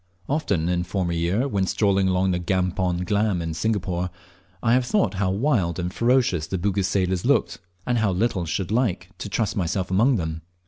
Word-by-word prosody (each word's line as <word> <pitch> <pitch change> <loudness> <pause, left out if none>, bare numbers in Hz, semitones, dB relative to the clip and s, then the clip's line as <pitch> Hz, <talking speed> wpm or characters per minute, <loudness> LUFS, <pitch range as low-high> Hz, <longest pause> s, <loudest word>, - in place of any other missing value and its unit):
Often 100 - 0
in 90 0 +1
former 90 0 -2
year, 90 +10 0
when 100 -7 0
strolling 100 -2 +2
along 95 0 +2
the 90 - 0
Campong 90 0 0
Glam 105 -2 +1
in 80 -1 -3
Singapore, 90 -1 -1 0.5
I 115 -1 +3
have 130 +1 +4
thought 160 - +1
how 95 - +2
wild 95 - +1
and 90 0 -3
ferocious 115 -10 +2
the 95 - -2
Bugis 95 +1 0
sailors 95 -2 0
looked, - - +1 0.3
and 120 -1 +1
how 110 -3 +2
little 95 -1 0
should 90 +4 -2
like 105 -6 0
to - - -5
trust 105 +1 -1
myself 95 0 -1
among 115 +8 +4
them. 80 -4 -3
95 Hz, 185 wpm, -24 LUFS, 90-110 Hz, 0.5 s, have